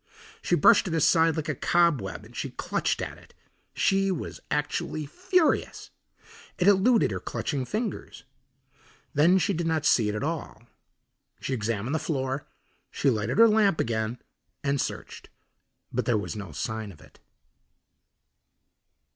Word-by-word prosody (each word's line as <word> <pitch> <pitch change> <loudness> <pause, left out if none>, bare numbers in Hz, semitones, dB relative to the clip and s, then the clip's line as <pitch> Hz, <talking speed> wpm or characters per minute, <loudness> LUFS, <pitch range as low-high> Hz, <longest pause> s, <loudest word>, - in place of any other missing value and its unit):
She - - +1
brushed - - +5
it 165 - -2
aside 165 +1 +4
like 155 -2 -3
a 155 - 0
cobweb 150 - +1
and - - -16
she - - -3
clutched - - -2
at - - -7
it. - - -21 0.4
She 195 0 +2
was 180 -4 -4
actually 150 +1 -2
furious. 320 - 0 0.7
It 180 - +1
eluded 205 +4 +4
her - - -3
clutching 140 -4 -3
fingers. 215 - -4 0.9
Then 165 +6 +5
she 195 +2 +1
did 170 -1 -2
not 160 -2 0
see 110 -7 +4
it 105 - -2
at 105 - -3
all. 155 -6 -4 0.8
She 135 - -3
examined 115 +1 -2
the 160 - +1
floor, 135 -2 -3 0.4
she 140 - +1
lighted 110 - -2
her 230 +1 +8
lamp 210 -5 +3
again 110 +1 -1 0.5
and 140 -1 +1
searched, - - -6 0.6
but - - -1
there 120 - +2
was 105 - -4
no 100 -5 -7
sign 110 +8 -4
of 80 - -16
it. - - -19
150 Hz, 145 wpm, -27 LUFS, 115-175 Hz, 0.9 s, her